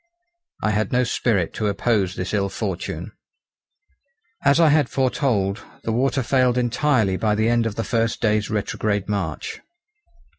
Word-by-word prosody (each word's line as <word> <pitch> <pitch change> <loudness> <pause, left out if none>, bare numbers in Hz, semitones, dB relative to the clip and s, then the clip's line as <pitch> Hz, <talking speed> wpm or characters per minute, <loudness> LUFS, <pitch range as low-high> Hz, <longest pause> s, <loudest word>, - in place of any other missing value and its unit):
I 105 - +2
had 105 +1 0
no 125 0 +3
spirit 110 -7 0
to 110 - -1
oppose 100 -2 0
this 90 - -4
ill 100 -1 +1
fortune. 95 -2 -4 1.3
As 140 +3 +4
I 165 -2 +6
had 150 -3 +3
foretold, 120 -6 0 0.2
the 115 - -2
water 130 +3 +1
failed 125 0 +2
entirely 120 -5 +1
by 105 0 +1
the 110 +1 +1
end 120 -1 +2
of 105 - -5
the 115 - -2
first 115 +1 0
day's 105 -2 +1
retrograde 105 -1 -1
march. 95 -7 -3
110 Hz, 150 wpm, -22 LUFS, 100-125 Hz, 1.3 s, I